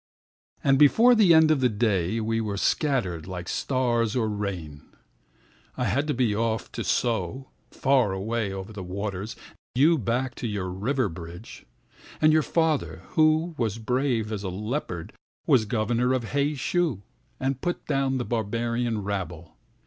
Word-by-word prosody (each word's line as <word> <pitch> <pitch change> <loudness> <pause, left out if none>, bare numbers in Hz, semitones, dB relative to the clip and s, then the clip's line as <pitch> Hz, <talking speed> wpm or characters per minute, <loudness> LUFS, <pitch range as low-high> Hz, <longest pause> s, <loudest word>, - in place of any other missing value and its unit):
And 135 -1 +4
before 225 - +6
the 215 -7 +5
end 160 -1 +6
of 155 - +3
the 125 -1 +3
day 105 -2 0
we 115 +1 0
were 105 -2 -3
scattered 100 - 0
like 90 -2 -6
stars 120 -4 0
or 115 -3 +1
rain.I 95 -8 -8
had 140 +4 0
to 150 - 0
be 120 -4 +1
off 110 0 -1
to - - -4
So, 115 +2 -1 0.2
far 130 -6 +2
away 105 +2 -2
over 95 +2 -7
the 100 - -7
waters, 100 +2 -4 0.4
You 155 +5 +4
back 125 +4 -1
to 120 - -1
your 100 -4 -3
river 115 +6 0
bridge. 85 +3 -10 0.5
And 155 0 +5
your 155 - +5
father, 160 -1 0
who 160 +1 +3
was 115 -3 0
brave 120 -1 0
as 105 -2 -3
a 95 - -3
leopard, 100 - -4 0.3
Was 120 -5 +4
governor 120 +4 +1
in 125 - -2
Hei 140 +5 0
Shu 150 - -1 0.4
and 135 0 -1
put 175 0 -3
down 135 -2 0
the 125 - -2
barbarian 115 0 -1
rabble. 90 -5 -5
115 Hz, 155 wpm, -26 LUFS, 100-135 Hz, 0.5 s, before